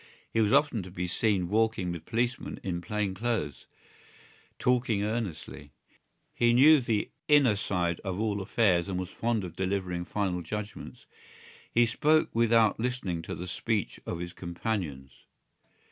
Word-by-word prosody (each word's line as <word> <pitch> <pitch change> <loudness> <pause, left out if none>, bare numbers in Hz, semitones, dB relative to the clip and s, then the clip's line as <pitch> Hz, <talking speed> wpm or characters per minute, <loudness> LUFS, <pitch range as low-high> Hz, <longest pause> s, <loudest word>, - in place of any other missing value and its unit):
He 115 - +3
was 105 -1 +2
often 135 -7 +3
to 95 - -9
be 90 0 -4
seen 95 0 +1
walking 110 -3 +1
with 85 -2 -7
policemen 120 +1 -2
in 90 -2 -3
plain 105 +1 -2
clothes, 95 - -2 0.9
talking 120 -5 +1
earnestly. 95 - -4 0.6
He 120 0 +3
knew 145 +5 +7
the 110 -4 -1 0.2
inner 145 -8 +5
side 90 -4 -1
of 95 -1 -4
all 105 -2 0
affairs 95 -3 +2
and 95 - -2
was 90 -1 -3
fond 115 -1 -1
of 90 - -7
delivering 95 -2 -2
final 95 -3 -1
judgments. 105 +5 -7 0.7
He 120 0 +4
spoke 150 +7 +2
without 115 -2 +3
listening 115 -8 -2
to - - -6
the 90 - -6
speech 105 +2 -2
of 85 - -3
his 85 +1 -6
companions. 85 -7 -4
100 Hz, 145 wpm, -29 LUFS, 90-115 Hz, 0.9 s, knew